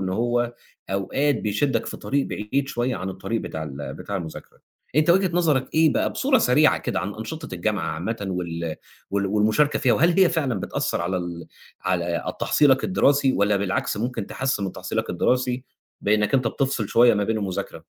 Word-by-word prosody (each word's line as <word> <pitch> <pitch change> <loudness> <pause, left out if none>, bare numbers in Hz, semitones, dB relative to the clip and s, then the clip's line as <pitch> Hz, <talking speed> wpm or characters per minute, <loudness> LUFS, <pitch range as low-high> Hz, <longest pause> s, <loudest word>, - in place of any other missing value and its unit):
إن 95 - -2
هو، 120 +4 0 0.4
أوقات 130 +10 +1
بيشدك 115 +3 0
في - - -5
طريق 140 0 -1
بعيد 135 +7 -2
شويّة 120 -1 -1
عن 95 0 -4
الطريق 100 +4 -3
بتاع 80 - -5
ال 70 -2 -6
بتاع 100 - -5
المذاكرة، 80 -4 -8 0.4
أنت 155 +2 +4
وجهة 190 +1 +4
نظرك 150 -7 +1
إيه 160 -1 +5
بقى - - +1
بصورة - - +3
سريعة - - +4
كده - - -2
عن 100 - -4
أنشطة 150 +9 -6
الجامعة 95 -1 -1
عامةً 100 +7 -4
وال 85 -3 -3 0.3
وال 100 0 0
والمشاركة 110 +9 +2
فيها 130 -4 +3
وهل 170 +3 +3
هي 185 - +7
فعلًا 140 - -1
بتأثّر - - -2
على 90 +2 -1
ال 85 -1 -5 0.3
على 85 -2 -1
ال - - -5
تحصيلك 135 -3 +3
الدراسي 140 -7 +3
والّا 100 -1 +2
بالعكس 100 0 -1
ممكن 115 -1 -3
تحسّن 135 -6 -2
من 95 - -3
تحصيلك 110 +5 -3
الدراسي، 125 +7 0 0.4
بأنك 105 +3 +2
أنت 130 -3 +3
بتفصل 130 -5 -1
شوية 120 0 +5
ما 105 -1 +1
بين 110 +2 0
المذاكرة؟ 95 -3 -4
110 Hz, 180 wpm, -24 LUFS, 95-135 Hz, 0.4 s, هي